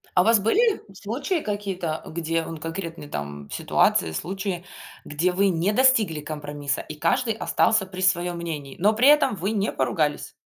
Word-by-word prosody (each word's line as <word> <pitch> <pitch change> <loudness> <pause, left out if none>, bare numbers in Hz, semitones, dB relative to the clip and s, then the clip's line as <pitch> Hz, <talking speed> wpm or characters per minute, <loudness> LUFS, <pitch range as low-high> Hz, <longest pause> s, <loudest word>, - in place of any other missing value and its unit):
А 180 - +6
у - - -1
вас 225 0 +5
были 430 - +2
случаи 260 - -2
какие-то, 195 - -3
где, 165 0 -2
вон, 165 0 -7
конкретные, 165 -1 -6
там, 70 - -6
ситуации, 80 -2 +2
случаи, 185 - -4 0.4
где 170 +5 0
вы 195 +2 +2
не 180 +3 +1
достигли 220 - +4
компромисса 145 -1 -4
и 155 - -8
каждый 240 - +1
остался 220 -2 +2
при 185 0 -8
своём 175 -1 +1
мнении, 150 -5 -6
но 205 +5 +4
при 245 +5 +4
этом 295 -7 +5
вы 195 +3 -2
не 210 -1 -1
поругались? 145 +4 -1
180 Hz, 165 wpm, -24 LUFS, 155-210 Hz, 0.4 s, А